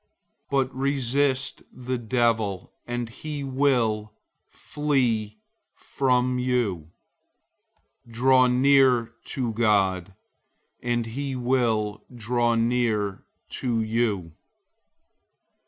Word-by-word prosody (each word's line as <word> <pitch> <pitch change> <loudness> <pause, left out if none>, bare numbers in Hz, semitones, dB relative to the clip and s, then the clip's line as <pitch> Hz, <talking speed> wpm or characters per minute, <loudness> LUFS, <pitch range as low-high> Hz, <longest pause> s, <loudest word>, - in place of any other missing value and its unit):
But 135 -1 0
resist 135 0 0
the 125 0 -4
devil, 115 -5 0
and 120 0 -3
he 145 +5 -6
will 125 -6 0 0.4
flee 120 -8 -1 0.4
from 125 -1 0
you. 115 -11 -1 1.2
004:008 115 - -15
Draw 130 +2 +4
near 125 -2 +4
to 120 -4 -2
God, 100 -4 +1 0.7
and 120 -1 -1
he 135 +4 -4
will 120 -4 0
draw 120 +1 +1
near 115 -4 0 0.3
to 115 -3 -1
you. 110 -6 -1
120 Hz, 85 wpm, -25 LUFS, 110-130 Hz, 1.2 s, Draw